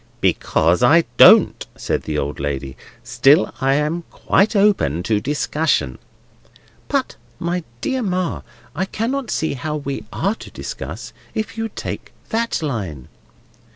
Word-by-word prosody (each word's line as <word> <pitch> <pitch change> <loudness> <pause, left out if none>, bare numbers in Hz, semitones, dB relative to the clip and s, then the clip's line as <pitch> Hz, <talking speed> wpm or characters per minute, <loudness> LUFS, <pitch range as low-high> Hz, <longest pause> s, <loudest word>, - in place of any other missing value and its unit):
"Because 85 +5 +2
I 165 +7 +6
don't," - - +7
said - - -2
the 75 -1 -3
old 70 0 -3
lady. 70 -2 -3 0.3
"Still, 145 +6 +4
I 135 +1 +3
am 150 +4 0
quite 200 +3 +1
open 195 - +3
to 105 +1 +1
discussion." 145 - 0 0.9
"But, - - -1 0.2
my 175 +1 -2 0.2
dear 260 -1 -1
Ma, 185 -4 -1 0.3
I 185 +5 0
cannot 235 +5 -2
see 160 - -1
how 150 +3 -3
we 140 -2 -4
are 195 - 0
to - - -11
discuss, - - -7 0.2
if 220 -1 -3
you 225 0 -3
take - - -6 0.2
that 230 -6 -1
line." 95 - -4
150 Hz, 135 wpm, -20 LUFS, -, 0.9 s, don't